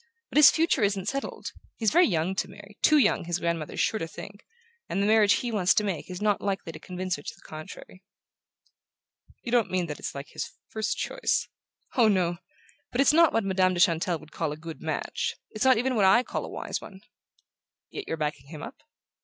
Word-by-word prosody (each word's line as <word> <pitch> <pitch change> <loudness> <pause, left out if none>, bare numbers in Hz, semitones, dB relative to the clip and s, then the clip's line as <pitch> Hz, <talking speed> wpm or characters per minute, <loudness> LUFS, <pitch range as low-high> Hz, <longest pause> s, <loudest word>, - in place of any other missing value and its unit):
But - - -1
his 300 - +10
future 330 -5 +2
isn't 200 -2 0
settled. 275 0 -4 0.3
He's 220 -3 +1
very 355 +1 +5
young 170 -1 0
to - - 0
marry 200 +1 -14
too 305 - +5
young, 210 - +3
his 175 0 -1
grandmother 170 -3 -2
is - - -5
sure 220 - +1
to 165 - -3
think 200 +4 -10 0.5
and - - -1
the 200 - +2
marriage 215 -1 +5
he 245 - -1
wants 195 -4 +3
to 210 - +3
make 190 -5 -3
is 180 0 -6
not 210 -2 +2
likely 195 -4 -2
to 155 - -10
convince 185 +1 -4
her - - -10
to - - -7
the - - -22
contrary." 155 +4 -10 1.4
"You 235 - -5
don't 240 -3 +3
mean 185 -1 0
that 150 -3 -6
it's - - -5
like 140 +1 -7
his - - -6 0.2
first 220 0 -2
choice?" - - 0 0.5
"Oh, 235 -4 +5
no! 180 -4 +2 0.5
But 245 - -3
it's 275 +2 +5
not 330 0 +6
what 225 - +1
Madame 185 -1 +2
de - - -2
Chantelle 170 -1 +3
would 155 0 -16
call 160 -3 -2
a 150 - -6
good 160 0 -9
match; - - -2 0.2
it's 215 +4 -2
not 260 -2 +6
even 255 +3 0
what 210 -5 +3
I 235 +6 +6
call - - -4
a - - -8
wise - - -4
one." 190 -1 -12 0.9
"Yet 415 - -6
you're - - -2
backing 150 -3 -3
him 150 -1 -9
up?" - - -8
195 Hz, 220 wpm, -27 LUFS, 170-225 Hz, 1.4 s, his